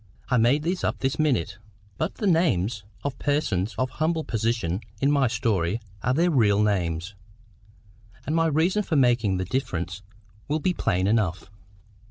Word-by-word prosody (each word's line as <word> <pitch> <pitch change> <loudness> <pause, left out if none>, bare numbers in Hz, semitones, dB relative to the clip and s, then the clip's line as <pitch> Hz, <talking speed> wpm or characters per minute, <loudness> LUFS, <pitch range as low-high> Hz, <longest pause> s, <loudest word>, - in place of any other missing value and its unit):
I 125 - +3
made 125 +6 +3
these 180 +3 -2
up - - 0
this 135 +2 -2
minute. 120 - 0 0.4
But 160 - -1
the 215 - -4
names 120 - +1 0.2
of 140 -1 -2
the - - -15
persons 115 -9 0
of 130 0 -1
humble 160 +1 0
position 110 - -1 0.2
in 140 +1 +2
my 140 -3 +3
story 105 -4 0 0.2
are 125 - 0
their 170 +3 +3
real 105 -7 +3
names. 90 -3 -1 1.1
And 155 - -1
my 165 0 +3
reason 165 +7 +2
for 180 -5 -2
making 120 -8 +3
the 95 - -2
difference 90 -6 -3 0.5
will 150 - 0
be 180 +4 +1
plain 95 - 0
enough. 100 -4 0
120 Hz, 165 wpm, -25 LUFS, 100-155 Hz, 1.1 s, I